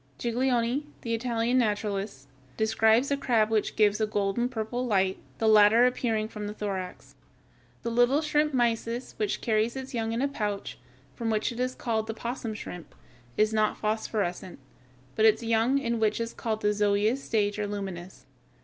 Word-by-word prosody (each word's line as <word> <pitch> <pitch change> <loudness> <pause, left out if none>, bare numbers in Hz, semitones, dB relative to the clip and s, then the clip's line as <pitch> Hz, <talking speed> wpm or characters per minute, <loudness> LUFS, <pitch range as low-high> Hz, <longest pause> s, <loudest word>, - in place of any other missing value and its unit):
Giglioli, 245 - 0
the 230 - -3
Italian 235 +1 +1
naturalist, 205 - -2 0.3
describes 220 +4 +3
a 280 - +2
crab 225 -5 +2
which 215 -2 0
gives 210 0 +3
a 215 - +2
golden 210 +4 0
purple 240 +1 -3
light, 190 -5 +1 0.2
the 225 - 0
latter 215 +2 +6
appearing 225 -3 0
from 210 -2 -6
the 210 - -6
thorax. 190 -4 -5 0.7
The 235 - -2
little 245 +5 +3
shrimp, 300 -1 +1
Mysis, 235 -1 -1
which 210 -2 -1
carries 220 +1 +1
its 265 0 -6
young 225 -2 -1
in 230 +3 -1
a - - +3
pouch, 210 -7 -4 0.3
from 230 -1 -3
which 215 +2 0
it 235 - -8
is 255 0 -1
called 220 -2 -2
the 225 - -3
opossum 235 -1 -4
shrimp, 180 -5 -9 0.4
is 215 +1 +3
not 215 -1 +1
phosphorescent, 210 -4 -2 0.6
but 220 - +3
its 220 +1 +4
young 230 +4 +2
in 235 -4 -1
what 215 0 +1
is 230 0 -3
called 220 -2 -3
the 210 - +3
zoëa 210 +2 +2
stage 215 -6 -1
are 210 - -1
luminous. 190 -3 -6
220 Hz, 170 wpm, -27 LUFS, 210-240 Hz, 0.7 s, latter